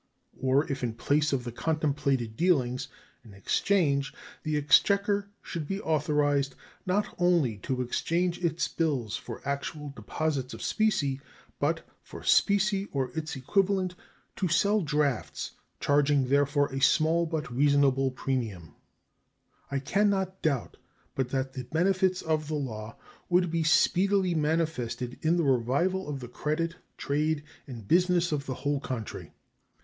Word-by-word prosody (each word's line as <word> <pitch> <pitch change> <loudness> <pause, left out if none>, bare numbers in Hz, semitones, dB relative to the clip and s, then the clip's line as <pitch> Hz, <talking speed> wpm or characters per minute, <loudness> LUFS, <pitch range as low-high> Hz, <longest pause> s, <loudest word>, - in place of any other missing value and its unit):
Or 135 +3 +2
if 135 - -3
in 115 -2 -2
place 150 +5 +1
of 135 -3 0
the 120 - -5
contemplated 140 -5 -1
dealings 130 -6 +1 0.4
in 105 -4 -14
exchange 140 - +1 0.3
the 155 -2 -1
exchequer 200 +7 +3
should 160 -4 -5
be 195 +4 -2
authorized 145 -4 +1 0.3
not 200 +3 0
only 170 -11 +3
to 125 +5 -2
exchange 175 +8 -1
its 165 -1 +1
bills 135 -10 -1
for - - -8
actual 145 +1 -3
deposits 130 +3 -2
of - - -8
specie, 145 -12 +1 0.4
but, - - 0 0.2
for - - -11
specie 200 0 +3
or 130 -3 -1
its 155 -1 -3
equivalent, 185 +6 +1 0.4
to 190 - 0
sell 200 +6 +3
drafts, 150 -6 -1 0.3
charging 145 -2 +2
therefor 145 +1 +3
a 135 - -2
small 165 +4 +3
but 155 -5 -3
reasonable 140 0 +3
premium, 120 - -3 1.0
I 140 - -1
can 195 +10 +2
not 190 -1 -1
doubt 140 -8 -1 0.4
but 130 -2 -1
that 130 0 -2
the 130 -2 -6
benefits 185 - +1
of 155 -1 0
the 155 - -2
law 115 -6 -5 0.3
would 180 -1 +3
be 165 0 0
speedily 185 +3 +3
manifested 150 -6 -1
in 165 +2 +2
the 170 - +2
revival 140 +8 +1
of 140 -2 -4
the 125 - -6
credit, 160 +7 -2 0.2
trade, 150 +1 0 0.2
and 115 -6 -9
business 180 - +3
of 145 -2 -2
the 130 - -3
whole 140 +2 -1
country. 125 -6 -5
150 Hz, 140 wpm, -28 LUFS, 135-175 Hz, 1.0 s, exchequer